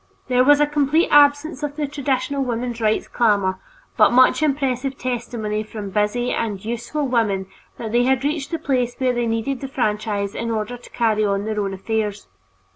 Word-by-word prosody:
There 250 0 +4
was 290 +2 +5
a 295 - +5
complete 295 +2 +1
absence 290 +1 +4
of 290 -1 -3
the 295 -1 -2
traditional 275 -1 -1
women's 240 -1 -3
rights 215 0 +1
clamor, 200 -5 +1 0.4
but - - +6
much 255 +4 +5
impressive 270 -2 0
testimony 235 -4 -3
from 210 -2 -7
busy 210 +5 0
and 210 -3 -3
useful 240 +6 -3
women 215 -6 0 0.3
that 220 -2 -5
they 240 +1 +3
had 265 0 +2
reached 290 -1 -1
the 330 - -2
place 255 -6 -1
where 255 -1 +1
they 240 -1 -1
needed 230 +4 -2
the 270 - -4
franchise 210 -5 -1
in 230 - -3
order 220 +1 -2
to 245 - -14
carry 220 -2 +1
on 200 0 0
their 215 -1 -2
own 195 -1 -2
affairs. 210 +1 -3
240 Hz, 185 wpm, -21 LUFS, 215-275 Hz, 0.4 s, but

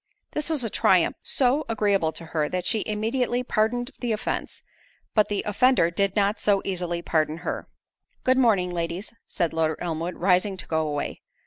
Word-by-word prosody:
This 300 +1 -2
was 305 -6 0
a 225 - -1
triumph - - +3
so 270 +3 +2
agreeable 200 -7 +2
to 170 - -9
her, 155 -2 -1
that 180 -1 -2
she 220 - +1
immediately 240 +4 0
pardoned 245 +2 0
the 240 -2 -2
offence; 215 - -4 0.5
but 215 -2 +4
the 205 - -1
offender 210 -4 +3
did 200 +2 0
not 205 0 +2
so 200 -1 +3
easily 175 -2 -2
pardon 155 -1 +1
her. - - -3 0.6
"Good 255 0 +3
morning, 200 -8 +3
ladies," 175 +5 -3
said 170 -4 -1
Lord 160 -1 +1
Elmwood, 170 +1 -3
rising 185 +2 +2
to - - -7
go 160 -1 0
away. 145 -1 -3
200 Hz, 175 wpm, -25 LUFS, 170-230 Hz, 0.6 s, but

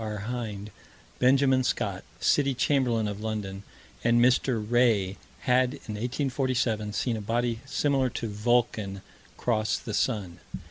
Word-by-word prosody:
R. 105 -1 -4 0.2
Hind, 105 -4 -5 0.5
Benjamin 130 0 +4
Scott, - - -1 0.2
City 140 -2 +2
Chamberlain 125 -5 +1
of 105 0 -5
London, 105 -3 -4 0.4
and 120 0 +4
Mr. 125 +1 +3
Wray, 105 -3 +2 0.2
had, 125 0 +2
in 110 - -8
1847, 125 -2 -1
seen 115 0 -1
a - - -5
body 115 +2 -1
similar 135 -2 +1
to 115 - -4
"Vulcan" 105 -2 0 0.3
cross 110 -3 0
the 110 - -7
sun. 105 -4 -1
115 Hz, 130 wpm, -27 LUFS, 105-125 Hz, 0.5 s, Benjamin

